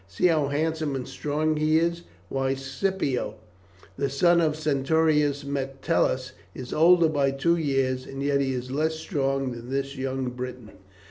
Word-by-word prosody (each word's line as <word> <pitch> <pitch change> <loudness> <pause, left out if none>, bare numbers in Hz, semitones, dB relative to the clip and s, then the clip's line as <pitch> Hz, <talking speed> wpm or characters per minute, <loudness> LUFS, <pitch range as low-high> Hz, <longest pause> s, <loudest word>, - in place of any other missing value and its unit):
"See 100 - -1
how 155 -5 +3
handsome 155 0 -1
and 130 -2 -4
strong 155 +1 -1
he 155 +1 +3
is; 170 +1 0 0.3
why, 135 0 -1
Scipio, 135 - -2 0.6
the 140 0 0
son 170 +5 +4
of 155 -2 +2
the - - -9
centurion 150 0 +2
Metellus, 135 -1 -1 0.2
is 125 -1 -6
older 170 +1 +6
by 145 -3 +1
two 135 +5 +1
years, 135 -5 0
and 135 0 -5
yet 140 0 +2
he 135 -1 0
is 125 0 -4
less 155 +3 0
strong 135 -5 -1
than 120 0 -8
this 135 +1 -2
young 130 -1 -2
Briton." 125 -2 -7
140 Hz, 160 wpm, -26 LUFS, 135-155 Hz, 0.6 s, older